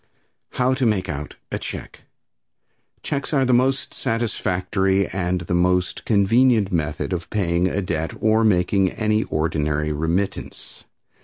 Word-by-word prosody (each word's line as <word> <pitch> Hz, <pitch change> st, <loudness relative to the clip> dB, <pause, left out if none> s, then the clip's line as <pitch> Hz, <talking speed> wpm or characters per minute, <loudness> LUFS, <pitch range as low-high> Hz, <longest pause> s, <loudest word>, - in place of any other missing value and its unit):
How 130 Hz, +1 st, +2 dB
to 130 Hz, -1 st, 0 dB
Make 100 Hz, -4 st, 0 dB
Out 75 Hz, 0 st, -5 dB, 0.2 s
a -, -, -2 dB
Check. -, -, -7 dB, 1.0 s
Checks 140 Hz, +1 st, -3 dB
are 135 Hz, -2 st, +3 dB
the 125 Hz, -, +2 dB
most 130 Hz, +2 st, +1 dB
satisfactory 95 Hz, -4 st, 0 dB
and 90 Hz, -1 st, -2 dB
most 90 Hz, +1 st, +1 dB
convenient 110 Hz, 0 st, +3 dB
method 75 Hz, -2 st, -1 dB
of 85 Hz, -1 st, -4 dB
paying 90 Hz, -3 st, +1 dB
a 95 Hz, +2 st, -1 dB
debt 80 Hz, -2 st, -2 dB
or 110 Hz, +1 st, +3 dB
making 95 Hz, -1 st, +3 dB
any 110 Hz, -1 st, +1 dB
ordinary 75 Hz, -1 st, -1 dB
remittance. 85 Hz, +6 st, -3 dB
95 Hz, 130 wpm, -22 LUFS, 85-110 Hz, 1.0 s, are